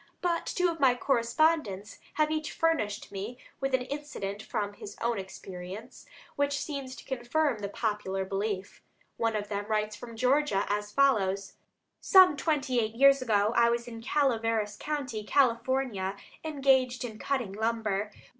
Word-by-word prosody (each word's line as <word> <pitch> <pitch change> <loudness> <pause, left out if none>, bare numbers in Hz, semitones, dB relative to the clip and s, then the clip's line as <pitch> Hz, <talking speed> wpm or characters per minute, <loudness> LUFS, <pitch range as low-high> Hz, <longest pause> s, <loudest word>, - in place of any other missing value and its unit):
But 345 -2 0
two 360 -1 +1
of 330 - -8
my 260 -3 +5
correspondents 235 -4 +1 0.2
have 305 +1 +2
each 310 0 -2
furnished 270 -12 0
me 205 +5 -5 0.2
with 270 -1 +1
an 255 - -1
incident 250 -8 -5
from 205 -1 -3
his 205 - -10
own 235 -2 0
experience, 190 +3 -9 0.3
which 285 0 +1
seems 275 -4 -5
to - - -12
confirm 265 0 0
the 200 -1 -4
popular 205 -3 -2
belief. 195 0 -3 0.4
One 225 -1 0
of 205 -1 -2
them 205 0 -3
writes 215 -1 0
from 230 +2 -9
Georgia 255 -4 +2
as 210 0 -1
follows: 200 -8 +2 0.5
"Some 375 -5 +7
twenty 275 -4 0
eight 220 -1 -1
years 275 +2 +6
ago 215 -2 +2
I 235 0 +5
was 235 0 -1
in 230 -1 -8
Calaveras 225 -6 +1
County, 265 -6 -3
California, 235 -5 +1 0.3
engaged 265 -5 +2
in 220 -3 -8
cutting 255 -8 -1
lumber. 215 -2 -1
235 Hz, 150 wpm, -29 LUFS, 210-275 Hz, 0.5 s, Some